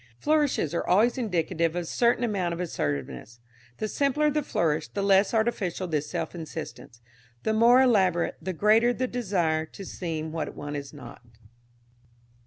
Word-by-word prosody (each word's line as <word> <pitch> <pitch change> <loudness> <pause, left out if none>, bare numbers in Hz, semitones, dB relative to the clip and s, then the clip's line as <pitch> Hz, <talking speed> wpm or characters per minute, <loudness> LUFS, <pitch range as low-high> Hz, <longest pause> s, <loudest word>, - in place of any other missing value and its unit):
Flourishes 295 - +1
are 170 - -2
always 220 +7 +4
indicative 170 -6 -1
of 175 - -1
a - - -9
certain 235 +7 +1
amount 190 -7 -1
of - - -9
assertiveness. 75 - -4 0.4
The 215 - -2
simpler 285 +5 +1
the 300 +1 0
flourish 160 - -1
the 200 - -4
less 195 0 +4
artificial 220 -5 -1
this 150 -3 -2
self - - -3
insistence; 160 -7 -8 0.4
the 220 - +1
more 240 +4 +6
elaborate, 190 -8 +2
the 185 - -3
greater 220 +7 +4
the 255 - -1
desire 180 -10 -1
to 195 - -10
seem 160 -4 -4
what 160 -1 -4
one 145 0 -6
is 140 -1 -6
not. 145 -3 -11
185 Hz, 160 wpm, -26 LUFS, 160-230 Hz, 0.4 s, more